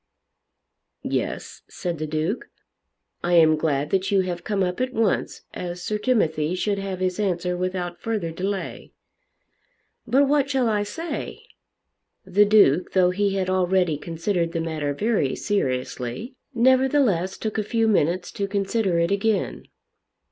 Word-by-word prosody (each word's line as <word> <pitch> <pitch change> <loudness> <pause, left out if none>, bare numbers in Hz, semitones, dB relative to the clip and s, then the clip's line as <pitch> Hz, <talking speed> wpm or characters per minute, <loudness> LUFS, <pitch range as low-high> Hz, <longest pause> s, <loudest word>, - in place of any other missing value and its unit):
"Yes," - - -3
said 175 -3 -4
the 155 - -2
Duke, 155 +8 -2 0.7
"I 175 - 0
am 160 -2 +6
glad 150 -2 -1
that 190 0 +1
you 195 -1 +3
have 180 -2 -4
come 200 -2 0
up 180 +4 -2
at 255 0 -1
once, 220 -3 0
as 175 0 -5
Sir 210 0 -2
Timothy 170 -9 +1
should 200 +2 -1
have 195 -2 -4
his 185 +1 -1
answer 180 -3 0
without 180 -1 -3
further 215 -7 -2
delay." 190 +3 -4 1.1
"But 270 +5 +4
what 280 -1 +2
shall 265 -3 +1
I 210 -2 +1
say?" 320 +12 -5 0.8
The 205 +3 +4
Duke, 200 -6 +4
though 180 -1 +4
he 200 +1 0
had 190 -1 0
already 185 -3 +2
considered 170 +2 -2
the 165 - -1
matter 155 -3 -2
very 205 - +1
seriously, 130 - -2 0.2
nevertheless 255 - +3
took 220 0 -3
a - - 0
few 225 +1 +1
minutes 180 -3 +1
to 200 - -3
consider 195 -1 0
it 170 +1 +1
again. 200 +1 0
190 Hz, 145 wpm, -24 LUFS, 170-215 Hz, 1.1 s, am